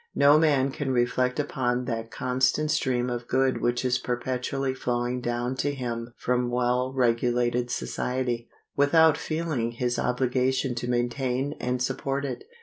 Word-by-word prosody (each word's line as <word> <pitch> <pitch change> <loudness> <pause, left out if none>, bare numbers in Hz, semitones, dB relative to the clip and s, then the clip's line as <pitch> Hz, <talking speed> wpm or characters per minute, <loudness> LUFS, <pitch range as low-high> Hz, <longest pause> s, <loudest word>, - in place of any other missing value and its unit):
No 145 +2 +6
man 140 -4 +3
can 135 0 -3
reflect 125 +1 +1
upon 125 -3 -1
that 115 -2 -3
constant 130 +5 +1
stream 125 -5 +1
of 120 -1 -4
good 130 0 +1
which 120 +1 0
is 125 0 +2
perpetually 130 +2 -2
flowing 125 -1 -2
down 120 +1 -1
to 145 +2 -1
him 120 -2 -5
from 125 0 0
well 125 +1 +1
regulated 120 -1 +1
society, 125 -2 -2 0.3
without 160 +2 +5
feeling 155 -8 -2
his 120 +1 -1
obligation 130 +1 +1
to 120 +1 -4
maintain 125 +3 -1
and 125 0 -1
support 135 +2 -2
it. 140 - -5
125 Hz, 145 wpm, -26 LUFS, 120-135 Hz, 0.3 s, No